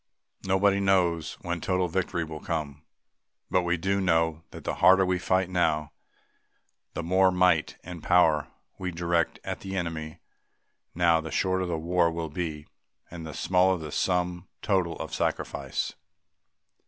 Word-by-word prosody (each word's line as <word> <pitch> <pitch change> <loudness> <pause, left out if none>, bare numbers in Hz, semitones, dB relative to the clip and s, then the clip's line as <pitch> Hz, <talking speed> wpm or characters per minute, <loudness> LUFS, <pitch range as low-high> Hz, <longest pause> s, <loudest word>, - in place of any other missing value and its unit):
Nobody 100 +1 +3
knows 90 -5 +1
when 85 -1 -3
total 90 -1 +1
victory 90 0 -1
will 80 -1 -7
come 75 -4 -4 0.7
but 90 - +3
we 90 0 0
do 100 +4 0
know 80 -3 +1
that - - -11
the - - -2
harder 95 +1 +7
we 90 0 0
fight 95 +1 +1
now, 80 -4 0 1.0
the 85 - -3
more 95 +2 +4
might 90 -3 +2
and 90 -1 -8
power 80 -4 +3 0.3
we 95 -1 -2
direct 85 -1 0
at - - -4
the 95 0 -5
enemy 80 -3 -4 0.8
now, 85 -1 +3
the 80 - -6
shorter 95 +1 0
the 85 -2 -1
war 85 +1 +2
will 80 -1 -4
be 75 -2 -4 0.5
and 85 -2 -7
the 80 - -7
smaller 95 0 +3
the 80 -3 -7
sum 90 +1 -1 0.2
total 95 -5 +1
of - - -6
sacrifice. - - -2
85 Hz, 150 wpm, -27 LUFS, 80-95 Hz, 1.0 s, harder